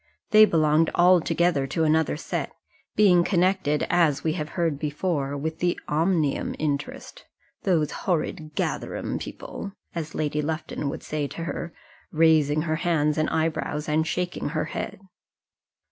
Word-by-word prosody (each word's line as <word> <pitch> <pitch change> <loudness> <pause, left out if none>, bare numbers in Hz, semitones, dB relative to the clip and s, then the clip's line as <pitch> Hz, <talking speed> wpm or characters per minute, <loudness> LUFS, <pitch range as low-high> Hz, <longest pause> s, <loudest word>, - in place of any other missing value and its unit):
They 215 0 +9
belonged 160 -3 +3
altogether 170 -4 +3
to 160 +4 -1
another 155 -1 +2
set, - - -4 0.4
being 185 -5 +5
connected, 180 -5 +1
as 155 -5 +3
we 160 - +1
have 155 -3 -4
heard 165 -5 0
before, 150 -2 -2
with 160 +3 -4
the 175 0 0
Omnium 160 -1 +1
interest 145 -2 -4 0.4
"those 165 -6 +2
horrid 155 -3 -2
Gatherum - - -2
people," 200 - -7 0.2
as 160 -3 -5
Lady 150 0 -1
Lufton 155 -1 -3
would - - -6
say 150 -2 -2
to 165 - -6
her, 170 0 -4 0.4
raising 155 -2 +3
her 155 -1 -1
hands 155 -3 +1
and 155 - +1
eyebrows, 155 -2 -1
and 155 +1 +1
shaking 180 -3 -2
her 155 0 -1
head. - - -5
160 Hz, 140 wpm, -25 LUFS, 150-170 Hz, 0.4 s, They